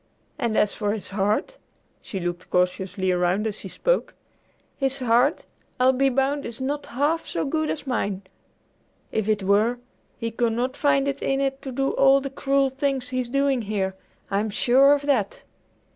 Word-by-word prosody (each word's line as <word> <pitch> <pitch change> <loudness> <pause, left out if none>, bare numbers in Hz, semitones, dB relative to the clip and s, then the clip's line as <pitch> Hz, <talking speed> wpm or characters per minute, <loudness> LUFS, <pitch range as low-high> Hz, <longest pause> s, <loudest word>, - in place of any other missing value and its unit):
And 230 -2 0
as 210 - +3
for 205 -1 -1
his 215 - -5
heart" 210 - -1 0.4
she 195 - -6
looked 175 0 -4
cautiously 185 +1 0
around 180 +4 +1
as 215 -1 -3
she - - -8
spoke - - -1 0.6
"his 270 -1 0
heart, 250 +4 +2 0.3
I'll 255 +1 +5
be 270 +1 +3
bound, 275 +2 0
is 230 +1 -7
not 285 +2 -3
half 295 +6 0
so - - -2
good 310 +2 -1
as 300 - -4
mine! 200 -7 -2 0.9
If 220 -1 -1
it 210 -2 +1
were, 210 +5 +3 0.4
he 230 -2 -3
could 230 0 0
not 250 +3 -1
find 285 -1 +2
it 280 0 -2
in 270 0 0
it 270 0 -1
to 265 - -6
do 270 +2 0
all 275 0 +5
the 275 0 -5
cruel 275 0 +1
things 270 -1 -1
he's 255 -1 -2
doing 275 -1 +1
here. 200 -3 -2 0.4
I'm 205 +2 0
sure 260 +6 +5
of 285 - -5
that." 260 -9 0
250 Hz, 175 wpm, -24 LUFS, 210-275 Hz, 0.9 s, I'll